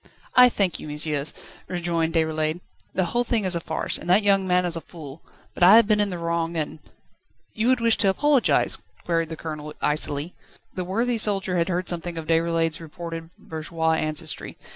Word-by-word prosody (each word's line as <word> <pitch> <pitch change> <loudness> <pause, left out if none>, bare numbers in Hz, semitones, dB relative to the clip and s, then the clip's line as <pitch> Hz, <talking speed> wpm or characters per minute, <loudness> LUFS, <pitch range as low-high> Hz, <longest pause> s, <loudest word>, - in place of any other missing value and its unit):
"I 250 0 +8
thank 195 -6 0
you, - - -8
messieurs," 150 -1 -1 0.4
rejoined 170 -2 -1
Déroulède. 160 0 0 0.4
"The 185 - +2
whole 240 0 +2
thing 225 -4 0
is 185 -1 0
a - - 0
farce, 160 -1 -2
and - - -8
that 195 +4 +5
young 195 -2 +3
man 180 0 +2
is 170 -1 -1
a 165 - -4
fool; 155 -3 -11 0.3
but - - -11
I 185 +4 +9
have 230 -1 +7
been 210 0 +2
in 205 -1 +1
the 180 - -4
wrong 170 0 -2
and 155 0 -3 0.4
..." - - -49 0.3
"You 220 +2 -1
would 255 -1 +3
wish 230 -1 +3
to 200 - +3
apologise?" 280 +6 +2 0.3
queried 165 -2 0
the 160 - -6
Colonel 150 -1 -7
icily. 150 +2 0 0.4
The 185 - -4
worthy 230 +5 0
soldier 195 -3 0
had 170 +2 0
heard 180 0 -1
something 175 -1 -3
of 160 - -4
Déroulède's 165 0 +1
reputed 165 0 -7
bourgeois 160 +1 -2
ancestry. 155 0 -2
170 Hz, 195 wpm, -24 LUFS, 160-190 Hz, 0.4 s, I